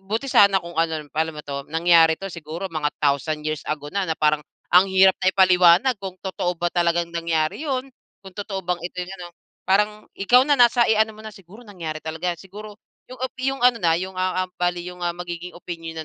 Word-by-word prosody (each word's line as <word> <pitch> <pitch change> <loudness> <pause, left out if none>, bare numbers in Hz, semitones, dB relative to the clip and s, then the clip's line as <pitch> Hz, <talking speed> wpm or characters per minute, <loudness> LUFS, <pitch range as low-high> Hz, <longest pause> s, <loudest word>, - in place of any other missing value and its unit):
buti 225 +6 -1
sana 200 -1 +5
kung 170 - -8
ano, 165 0 +1
alam - - -20
paano 160 +1 -1
ba 150 - -7
'to? 140 -1 -6
Nangyari 165 0 +4
ito 195 +3 -7
siguro 165 +3 -6
mga 155 -2 0
thousand 150 +2 0
years 155 -1 -2
ago 145 -1 -4
na, 195 -2 -1
na 160 - -1
parang 150 0 +2 0.3
ang 180 +2 +7
hirap 190 0 +5
na 185 - +4
ipaliwanag 185 +5 +5
kung 190 -2 -7
totoo 180 -2 -2
ba 175 - 0
talagang 170 -1 +1
nangyari 165 - -1
yun, 265 0 -2 0.4
kung 190 - -11
totoo 200 -1 -4
bang 175 0 -2
ito 180 0 -4
ano. 180 -2 -8 0.4
Parang 210 +2 +1
ikaw 245 +6 +5
na 290 0 +2
nasa, 240 0 +5
eh, 220 - +3
ano 220 0 +2
mo 215 - -13
na, 215 - -8
siguro 195 +5 -15
nangyari 165 -7 -7
talaga 160 +3 -3
yan, 170 - -11
siguro 205 +2 -11 0.3
yung 255 -1 -11
a 260 - -1
yung 270 +1 -1
ano 250 -1 +5
na, 165 -3 +3
yung 185 +2 -5
ah 185 0 0
ah 185 - -12
bali 175 0 -1
yung 180 0 -11
ang 175 0 -2
magiging 175 0 -7
opinyon 165 -2 -7
180 Hz, 220 wpm, -22 LUFS, 165-200 Hz, 0.4 s, ang